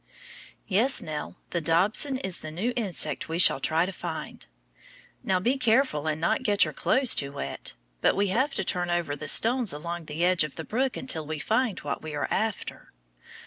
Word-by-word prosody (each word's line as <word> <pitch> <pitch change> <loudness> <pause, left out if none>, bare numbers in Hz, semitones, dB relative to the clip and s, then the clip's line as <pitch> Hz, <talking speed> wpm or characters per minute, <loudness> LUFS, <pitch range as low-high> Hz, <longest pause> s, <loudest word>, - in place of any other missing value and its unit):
Yes, 230 +8 +4
Nell, 155 -1 -5 0.2
the 170 - -1
dobson 195 - +2
is 190 -8 -3
the 155 - -7
new 195 +11 -2
insect 175 - -1
we 165 - -2
shall 175 - +5
try 160 +5 +1
to 190 - -4
find. 180 - -7 0.8
Now, 185 -1 +1
be 250 +8 0
careful 230 - +2
and 155 0 -1
not 165 - +1
get 205 -5 +3
your - - -5
clothes 260 -2 +3
too 140 -1 -1
wet, 70 - -6 0.3
but - - +3
we 200 0 +1
have 260 +8 0
to 195 - 0
turn 175 -1 -1
over 175 -4 -1
the 150 +1 -7
stones 235 - +4
along 170 +3 -5
the 155 +3 -1
edge 180 -2 +3
of 150 - -5
the 160 - -6
brook 255 +4 -1
until 160 - -3
we 155 0 -3
find 220 - 0
what 145 -1 -4
we 155 -1 -6
are 145 - -2
after. 220 -2 -3
180 Hz, 195 wpm, -26 LUFS, 155-225 Hz, 0.8 s, shall